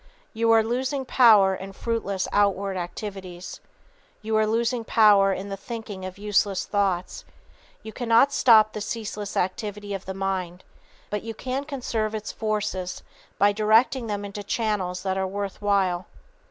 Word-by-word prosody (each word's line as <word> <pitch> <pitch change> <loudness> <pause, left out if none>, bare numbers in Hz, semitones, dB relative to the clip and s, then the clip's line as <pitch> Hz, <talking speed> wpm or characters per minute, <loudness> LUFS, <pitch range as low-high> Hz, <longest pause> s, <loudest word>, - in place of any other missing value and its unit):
You 230 0 0
are 225 -1 +6
losing 260 +4 -2
power 215 -7 +6
in 190 +1 -7
fruitless 200 -4 -2
outward 200 -1 +1
activities. 185 0 -6 0.6
You 220 0 -1
are 215 0 +3
losing 230 +2 0
power 205 -3 +5
in 195 +1 -4
the 195 - -3
thinking 205 -3 -7
of 185 +1 -7
useless 200 -2 0
thoughts. 195 -3 -1 0.6
You 220 - -8
cannot 240 +3 +3
stop 215 -5 +5
the 215 - -5
ceaseless 210 -1 -5
activity 205 +2 -3
of 195 -1 -5
the 190 - -5
mind. 185 -2 -3 0.5
But 210 -1 -2
you 225 0 -7
can 260 +4 -3
conserve 230 -6 -3
its 215 0 -5
forces 210 -4 -3 0.3
by 205 +1 +4
directing 225 +4 +3
them 205 -1 -3
into 200 +1 -6
channels 200 -4 -2
that 190 0 -1
are 190 - 0
worth 200 +1 -5
while. 190 -3 +1
205 Hz, 155 wpm, -25 LUFS, 195-225 Hz, 0.6 s, are